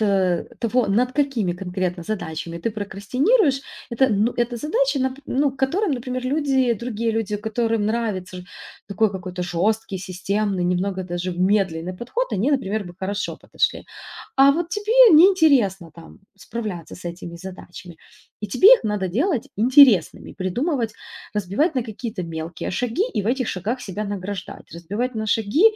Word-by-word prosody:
э, 190 Hz, -4 st, +1 dB, 0.2 s
того, 240 Hz, +1 st, +1 dB
над 245 Hz, +6 st, +1 dB
какими 260 Hz, -11 st, 0 dB
конкретно 180 Hz, -1 st, -3 dB
задачами 170 Hz, -4 st, -4 dB
ты 225 Hz, +7 st, -2 dB
прокрастинируешь, 260 Hz, -, +1 dB, 0.3 s
это, 260 Hz, +3 st, +3 dB
ну, 215 Hz, +3 st, +1 dB
это 240 Hz, 0 st, -1 dB
задачи, 275 Hz, 0 st, 0 dB
нап 260 Hz, +1 st, -1 dB
ну, 280 Hz, +2 st, +1 dB
которым, 275 Hz, +8 st, 0 dB
например, 255 Hz, 0 st, -4 dB
люди, 265 Hz, -3 st, +1 dB
другие 230 Hz, 0 st, -2 dB
люди, 215 Hz, -2 st, -1 dB
которым 220 Hz, 0 st, -1 dB
нравится 210 Hz, -5 st, -2 dB
ж 180 Hz, -, -9 dB, 0.4 s
такой 210 Hz, +1 st, +1 dB
какой-то 185 Hz, -1 st, -5 dB
жесткий, 190 Hz, +3 st, -1 dB
системный, 190 Hz, +1 st, -2 dB
немного 185 Hz, +1 st, -1 dB
даже 175 Hz, 0 st, -4 dB
медленный 185 Hz, -2 st, 0 dB
подход, 475 Hz, -, -3 dB
они, 225 Hz, +10 st, +1 dB
например, 215 Hz, -7 st, -1 dB
бы 175 Hz, 0 st, -10 dB
хорошо 200 Hz, +2 st, -3 dB
подошли. -, -, -1 dB, 0.5 s
А 275 Hz, +1 st, +7 dB
вот 335 Hz, +2 st, -2 dB
тебе 430 Hz, -1 st, +5 dB
неинтересно 280 Hz, -, +4 dB
там 165 Hz, +4 st, -14 dB, 0.2 s
справляться 205 Hz, -7 st, -6 dB
с 180 Hz, -, -13 dB
этими 170 Hz, 0 st, -7 dB
задачами, 180 Hz, -1 st, -10 dB, 0.4 s
и 210 Hz, -, -3 dB
тебе 370 Hz, -, +5 dB
их -, -, -5 dB
надо 205 Hz, -3 st, -1 dB
делать 270 Hz, -, 0 dB
интересными, 245 Hz, -, +5 dB
придумывать, 230 Hz, -, -2 dB, 0.4 s
разбивать 210 Hz, -, 0 dB
на 255 Hz, -, +1 dB
какие-то 220 Hz, -3 st, -6 dB
мелкие 165 Hz, 0 st, -5 dB
шаги 245 Hz, -, -1 dB
и 205 Hz, -, 0 dB
в -, -, -5 dB
этих 255 Hz, 0 st, 0 dB
шагах 215 Hz, +8 st, -3 dB
себя 210 Hz, -1 st, -5 dB
награждать, 200 Hz, -1 st, -6 dB
разбивать 205 Hz, +9 st, -3 dB
на 220 Hz, 0 st, -3 dB
шаги 220 Hz, -, +1 dB
215 Hz, 150 wpm, -22 LUFS, 185-255 Hz, 0.5 s, А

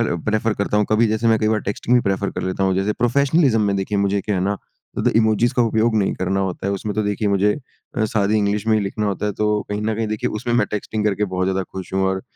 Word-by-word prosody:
अ, -, -, -1 dB
prefer 110 Hz, 0 st, 0 dB
करता 100 Hz, +1 st, -1 dB
हूँ 105 Hz, -, +3 dB
कभी 110 Hz, +2 st, +4 dB
जैसे 110 Hz, +2 st, 0 dB
मैं 110 Hz, -, +4 dB
कई 110 Hz, -, +1 dB
बार 110 Hz, -1 st, +1 dB
टेक्स्टिंग 115 Hz, +4 st, 0 dB
भी -, -, +4 dB
प्रेफ़र 100 Hz, 0 st, -1 dB
कर -, -, -5 dB
लेता 95 Hz, +1 st, -1 dB
हूँ 95 Hz, -1 st, +2 dB
जैसे 95 Hz, +3 st, 0 dB
प्रोफ़ेशनलिज्म 130 Hz, +1 st, +2 dB
में 100 Hz, -1 st, +1 dB
देखिए 100 Hz, +1 st, -1 dB
मुझे 100 Hz, 0 st, +1 dB
क्या 105 Hz, +1 st, -2 dB
है -, -, 0 dB
ना 100 Hz, +1 st, 0 dB, 0.6 s
इमोजिस 115 Hz, +2 st, +3 dB
का 125 Hz, -, +2 dB
उपयोग 115 Hz, 0 st, +1 dB
नहीं 100 Hz, -2 st, +1 dB
करना 95 Hz, +1 st, -1 dB
होता 95 Hz, 0 st, -3 dB
है 100 Hz, -, 0 dB
उसमें 100 Hz, +1 st, -3 dB
तो 110 Hz, -, 0 dB
देखिए 105 Hz, 0 st, -1 dB
मुझे 100 Hz, +1 st, +3 dB, 0.4 s
अ, 110 Hz, -, +2 dB
सादी 105 Hz, -1 st, +1 dB
इंग्लिश 105 Hz, +1 st, 0 dB
में 110 Hz, -, +3 dB
ही -, -, +1 dB
लिखना 105 Hz, +2 st, -2 dB
होता 100 Hz, +1 st, -2 dB
है 105 Hz, -, -1 dB
तो 105 Hz, -, +2 dB, 0.2 s
कहीं 105 Hz, +1 st, -2 dB
न 110 Hz, +1 st, 0 dB
कहीं 110 Hz, 0 st, -2 dB
देखिए 110 Hz, -1 st, -2 dB
उसमें 120 Hz, -1 st, -1 dB
मैं 105 Hz, -4 st, +3 dB
टेक्स्टिंग 105 Hz, +1 st, -3 dB
करके 105 Hz, 0 st, +1 dB
बहुत 95 Hz, 0 st, 0 dB
ज़्यादा 95 Hz, 0 st, 0 dB
खुश 95 Hz, 0 st, -7 dB
हूँ 95 Hz, -, +1 dB
और 95 Hz, 0 st, -2 dB
105 Hz, 270 wpm, -21 LUFS, 100-110 Hz, 0.6 s, कभी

